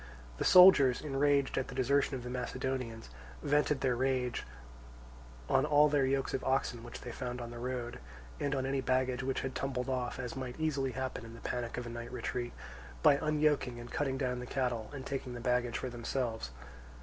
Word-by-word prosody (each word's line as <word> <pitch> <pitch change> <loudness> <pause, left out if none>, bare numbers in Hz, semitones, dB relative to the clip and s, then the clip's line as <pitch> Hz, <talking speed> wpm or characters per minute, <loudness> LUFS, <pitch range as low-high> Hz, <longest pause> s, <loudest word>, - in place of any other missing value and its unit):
The - - +1
soldiers, 180 -9 +8
enraged 140 -1 +2
at 130 - -3
the 125 - -8
desertion 140 +2 +2
of 125 - -5
the 125 - -5
Macedonians, 125 - -3 0.3
vented 145 -1 +2
their 125 -2 +2
rage 130 -1 0 1.0
on - - +3
all 150 0 +5
their 140 -2 +3
yokes 135 0 0
of 130 - -1
oxen 130 -3 0
which 120 - -8
they 125 - -6
found 125 0 -4
on 120 -1 -6
the 120 - -7
road, 125 0 -4 0.4
and 145 0 0
on 130 -1 -1
any 135 0 0
baggage 130 0 +1
which 135 0 -1
had 135 -1 -3
tumbled 130 -2 -2
off 125 -2 -2
(as 125 -2 -5
might 130 +1 -5
easily 140 -5 0
happen 130 -2 -4
in 115 0 -10
the - - -12
panic 120 -1 -3
of 125 - -3
a - - -5
night 115 0 -6
retreat), 120 0 -3 0.5
by 140 - +7
unyoking 150 -5 +1
and 120 0 -9
cutting 135 -2 -1
down 125 -2 -1
the 125 - -6
cattle 125 -5 -1
and 135 -2 -7
taking 130 -2 -4
the - - -5
baggage 125 -1 0
for 130 - -4
themselves. 120 - -2
130 Hz, 195 wpm, -33 LUFS, 125-135 Hz, 1.0 s, soldiers